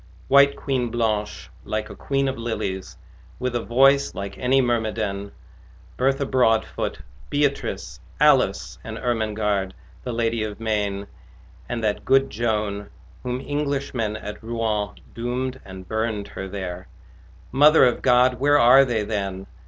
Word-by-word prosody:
White 140 0 +6
Queen 130 -4 -1
Blanche, 110 -3 -2
like 110 0 -3
a - - -9
queen 135 0 -1
of 135 - -1
lilies, 110 -5 -4 0.4
With 125 -1 -2
a 120 - 0
voice 135 +4 +3
like 100 0 -5
any 130 +2 +3
mermaidén 110 -5 -1 0.7
Bertha 135 +2 +1
Broadfoot, 120 -4 +1 0.3
Beatrice, 145 -1 -1 0.2
Alice, - - +3
And - - -6
Ermengarde, 105 -4 -1 0.3
the 125 - -4
lady 115 -1 0
of 105 -1 -5
Maine 105 -3 -1 0.6
And 120 -2 -3
that 105 -1 0
good 135 +1 +3
Joan 105 -2 -2 0.3
whom 125 0 -3
Englishmen 140 -7 -2
At 105 -1 -8
Rouen 110 -3 -1 0.2
doomed 125 +2 -3
and 95 -1 -10
burned 110 -1 -2
her 95 - -6
there 95 -2 -6 0.6
Mother 150 +3 +6
of 125 - +1
God, 125 0 +4
where 145 +2 +4
are 130 +1 +7
they 120 -5 0
then? 100 -3 -3
115 Hz, 135 wpm, -23 LUFS, 105-130 Hz, 0.7 s, are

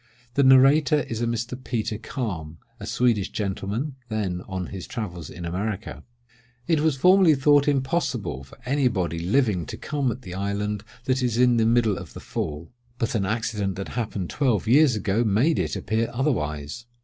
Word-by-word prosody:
The 140 - +3
narrator 135 +3 +6
is 115 -3 -4
a 120 - +1
Mr. 120 +2 -3
Peter 110 -3 -2
Kalm, 90 - -5 0.2
a - - -7
Swedish 115 -6 +1
gentleman, 105 +7 -3
then 100 -5 -2
on 95 -1 -3
his 95 -2 -6
travels 90 - -5
in 85 -1 -7
America:— 100 +4 -4 0.6
"It 160 -3 +3
was 155 -2 +1
formerly 180 +1 +6
thought 145 +1 +4
impossible 130 - -1
for 65 - -16
any 135 +1 +2
body 90 -8 -1
living 95 - +1
to - - -6
come 140 -4 -1
at 125 +2 -8
the 90 - -8
island 100 +1 -2 0.2
that 130 -1 0
is 120 -3 0
in 125 -1 +4
the 110 -1 +3
middle 115 -3 +2
of - - -10
the - - -7
Fall; 75 +2 -5 0.3
but 115 -1 -1
an 100 -4 0
accident 105 -3 -1
that 95 +1 -5
happened 105 -6 -3
twelve 120 -8 +1
years 135 +1 +5
ago 105 +2 0
made 120 +10 +2
it - - -1
appear 110 +2 -1
otherwise. 115 - -2
115 Hz, 175 wpm, -25 LUFS, 95-130 Hz, 0.6 s, narrator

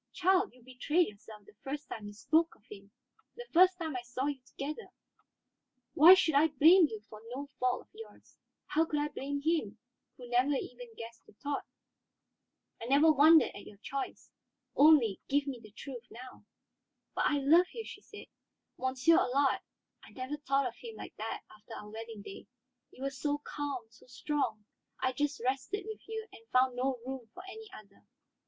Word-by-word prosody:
Child, 375 +2 +2
you 250 - -20
betrayed 295 +7 +1
yourself 210 0 -14
the - - -18
first 290 +2 -5
time 210 -2 -7
you 205 - -9
spoke 320 +10 +1
of 215 - -29
him, 200 -1 -11 0.5
the 485 - -8
first 365 +2 +6
time 320 -5 -4
I 250 - -2
saw 245 +2 -4
you 285 -2 -2
together. 300 +10 -6 1.1
Why 335 +6 +10
should 330 -4 +2
I 290 +3 +5
blame 320 +4 +6
you 220 -6 -7
for 215 -1 -12
no 280 +2 -4
fault 250 0 +1
of - - -22
yours? 450 +1 -13 0.3
How 315 - +2
could 300 -2 -1
I 295 0 -1
blame 285 0 -4
him, 305 -10 0 0.4
who 245 - -10
never 250 +4 +2
even 245 -3 -7
guessed 230 0 -9
your - - -19
thought? 285 +4 -4 1.1
I - - -5
never 285 +5 +5
wondered 310 +2 +6
at 205 - -10
your 205 - -13
choice; 275 +6 -6 0.4
only, 280 -9 +5
give 285 +1 +2
me 270 -4 -5
the 215 - -13
truth 245 +3 -9
now." 250 +2 -12 0.7
"But - - 0
I 290 - +2
love 320 +6 +5
you," 455 -2 -6
she 410 - -10
said. 415 - -12 0.5
"Monsieur 260 +5 +3
Allard; 270 +2 +2 0.4
I - - -14
never 260 +3 -5
thought 275 -2 +1
of 240 -1 -4
him 455 -2 -9
like - - -9
that - - -5
after 210 0 -12
our 210 - -9
wedding 225 -1 -8
day. 195 - -10 0.4
You 260 - -11
were 275 - -1
so 290 +2 -1
calm, 285 -4 -4
so 240 - -20
strong, 250 -5 -2 0.3
I 260 - +1
just 290 +2 -1
rested 270 +11 -2
with 435 -1 -7
you 445 0 -5
and 225 - -15
found 255 0 +3
no 260 +1 0
room 260 -3 -6
for - - -9
any 440 +2 -10
other. 200 -2 -14
275 Hz, 185 wpm, -32 LUFS, 240-315 Hz, 1.1 s, Why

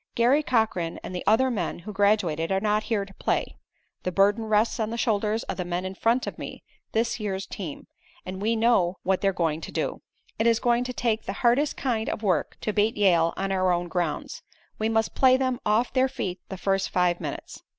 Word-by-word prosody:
Garry 250 +6 +4
Cochran 220 - 0
and 185 - -6
the 180 - -4
other 255 +5 +4
men 190 -8 -2
who 205 +5 -8
graduated 195 -5 +1
are 190 - +2
not 210 +1 +1
here 210 -4 +1
to 195 - -15
play. - - -1 0.5
The 180 - -2
burden 200 +4 +3
rests 220 +3 +2
on 220 -1 0
the 230 - -4
shoulders 220 -1 0
of - - -5
the 180 - -1
men 175 +1 -3
in 185 - -4
front 230 +6 +1
of - - -6
me, - - -7 0.3
this 230 +2 0
year's 195 -2 -3
team, 175 -7 -7 0.4
and 185 +1 -6
we 225 +2 +1
know 220 -6 +3
what 190 0 +1
they're 195 - +3
going 165 -3 -1
to - - -7
do. - - -2 0.4
"It 225 - +3
is 230 -1 +4
going 240 0 +2
to 250 - -4
take 230 -3 -1
the - - -3
hardest 270 +5 +3
kind 230 -5 -1
of 220 - -4
work 180 -7 0
to 215 - -2
beat 210 +2 +1
Yale 170 -5 +4
on 195 0 -2
our 185 -1 +2
own 175 0 0
grounds. 165 -3 -2 0.4
We 220 +1 +1
must 225 -1 +1
play 260 -1 +5
them 255 -2 -1
off 220 +4 +2
their 260 0 +3
feet 185 -7 -4
the 190 - -5
first 195 +1 0
five 180 -1 +1
minutes. - - -6
210 Hz, 220 wpm, -26 LUFS, 185-230 Hz, 0.5 s, play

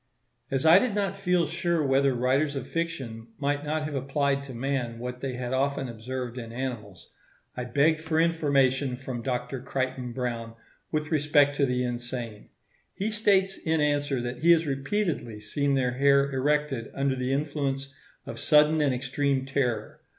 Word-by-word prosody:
As 135 +1 -1
I 165 +4 +8
did 240 -3 -1
not 195 -2 0
feel 180 -3 +1
sure 170 -1 0
whether 135 0 +3
writers 135 +4 +1
of 135 - -3
fiction 135 -10 -4
might 145 0 -1
not 155 +1 -1
have 150 0 -4
applied 140 +1 0
to 135 - -8
man 125 -2 -2
what 125 +1 -6
they 135 -2 -3
had 125 0 -4
often 135 0 0
observed 125 +1 -5
in 115 -1 -7
animals, 115 -8 -6 0.4
I 125 - -4
begged 145 +6 +2
for 160 0 0
information 140 -5 +2
from 130 -2 -5
Dr. 125 0 -3
Crichton 130 -1 -3
Browne 115 -2 -4 0.4
with 155 0 -2
respect 145 -2 +3
to 140 - +3
the 125 0 0
insane. 120 -3 -5 0.5
He 210 +3 -2
states 195 -3 +2
in 160 0 0
answer 145 -2 +1
that 120 +1 -4
he 170 +2 +6
has 165 0 +2
repeatedly 140 - -2
seen 140 +6 0
their 125 -2 +1
hair 140 +2 +3
erected 140 -2 0
under 135 -1 +1
the 130 0 -2
influence 140 -1 -2 0.3
of - - -7
sudden 150 +1 +4
and 140 -3 +2
extreme 135 +1 0
terror. 125 -5 -1
135 Hz, 165 wpm, -27 LUFS, 125-150 Hz, 0.5 s, I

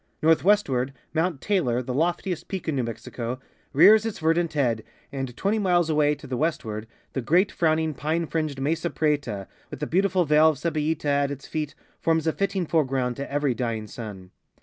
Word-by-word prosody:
Northwestward, 160 -6 +3 0.2
Mount 165 -2 0
Taylor, 130 - +1
the 125 - -4
loftiest 170 +4 -1
peak 190 -4 -5
in 155 - 0
New 130 - +1
Me.xico, 115 +1 -5 0.3
rears 210 +9 +7
its 225 -2 -3
verdant 165 +1 +1
head, 120 -7 +1 0.3
and 135 -3 -5
20 210 +3 +1
miles 175 -4 +2
away 150 -1 +3
to 145 - -13
the 130 -2 -3
westward 115 -8 -2 0.3
the 135 - -1
great 180 - +3
frowning 160 -1 +1
pine 160 +5 -1
fringed 155 -4 -2
Mesa 160 +5 0
Prieta, 145 -12 -1 0.2
with - - -8
the 150 - -1
beautiful 185 +1 +2
vale 150 +1 +6
of 155 - -1
Cebollila 155 0 -1
at 140 -1 +2
its 140 -1 -7
feet, 150 -2 -4 0.2
forms 160 -1 +1
a 160 - +2
fitting 195 -2 -1
foreground 135 -6 0
to 140 0 -5
every 145 -2 +1
dying 115 -3 -2
sun. 100 -4 -9
150 Hz, 180 wpm, -25 LUFS, 130-165 Hz, 0.3 s, rears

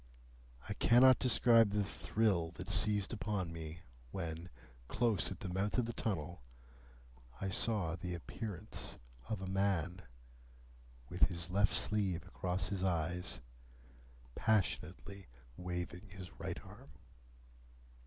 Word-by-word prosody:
I 100 - -2
cannot 125 +4 +6
describe 115 -3 +6
the 105 0 +1
thrill 85 +1 +1
that - - -5
seized 105 -1 +3
upon 100 -6 -2
me, 80 0 -7 0.3
when, 85 +1 -5 0.4
close 115 - +2
at - - -7
the 90 - -4
mouth 100 +5 0
of 125 - +3
the 120 - -4
tunnel, 85 - -3 1.0
I 100 - -2
saw 95 -6 +1
the 90 0 -4
appearance 95 +3 -5 0.3
of 110 -3 -2
a - - -4
man, 95 -2 0 1.1
with 90 +5 +3
his 85 -1 -5
left 100 +1 +3
sleeve 95 -5 +1
across 90 0 -2
his 95 -2 -2
eyes, 90 -1 -1 0.9
passionately 100 - -1 0.3
waving 90 +3 -5
his 95 -1 -9
right - - -3
arm. - - -13
95 Hz, 120 wpm, -36 LUFS, 85-105 Hz, 1.1 s, cannot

